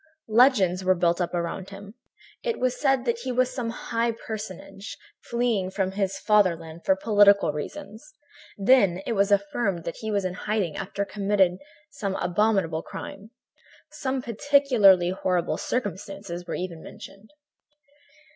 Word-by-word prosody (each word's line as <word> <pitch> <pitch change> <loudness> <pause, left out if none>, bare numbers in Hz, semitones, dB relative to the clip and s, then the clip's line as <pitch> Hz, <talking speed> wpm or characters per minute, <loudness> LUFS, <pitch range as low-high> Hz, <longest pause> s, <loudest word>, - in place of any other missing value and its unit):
"Legends 210 -7 +4
were 185 0 +3
built 170 0 +1
up 175 - -1
around 175 +2 -3
him. 200 +1 -11 0.5
It 475 -2 -2
was 255 -1 +1
said 270 -3 +2
that 235 -1 0
he 255 +2 -4
was 255 +1 +1
some 240 -3 -3
high 230 0 -1
personage, 210 -3 -8 0.3
fleeing 235 -6 0
from 190 -1 -1
his 195 -1 -2
fatherland 170 -6 +1
for 190 - +3
political 200 -5 +4
reasons; 205 - -8 0.5
then 195 -4 +4
it - - -2
was 200 -1 +2
affirmed 200 -2 0
that 170 - -5
he 220 - -5
was 200 -2 0
in 185 - -2
hiding 195 -3 -2
after 200 +1 -3
having - - -11
committed 195 -3 +2 0.3
some 195 -2 -3
abominable 180 -3 +1
crime. 205 +5 -9 0.6
Some 260 -2 -3
particularly 230 -8 +4
horrible 180 -2 -1
circumstances 195 -5 -4
were - - -3
even 175 -3 -5
mentioned. 200 +2 -12
200 Hz, 145 wpm, -25 LUFS, 185-230 Hz, 0.6 s, Legends